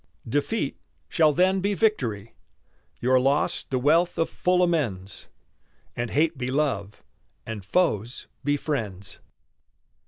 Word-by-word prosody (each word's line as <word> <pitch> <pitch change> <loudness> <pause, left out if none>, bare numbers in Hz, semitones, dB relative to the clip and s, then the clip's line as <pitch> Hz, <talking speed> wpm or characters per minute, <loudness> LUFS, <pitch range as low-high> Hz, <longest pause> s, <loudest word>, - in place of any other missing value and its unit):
Defeat 145 - -1 0.3
shall 155 -3 +4
then 185 +5 +3
be 200 +2 0
victory, 120 - 0 0.7
Your 130 +1 +3
loss 140 +3 +1
the 130 - -2
wealth 160 +7 +3
of 165 - 0
full 180 0 +2
amends, 115 - -2 0.7
And 120 0 -2
hate 155 -1 +1
be 125 - -2
love, 130 -8 -1 0.4
and 110 -3 -6
foes 115 - 0 0.2
be 145 +1 +1
friends. 110 -11 -4
140 Hz, 120 wpm, -25 LUFS, 115-170 Hz, 0.7 s, shall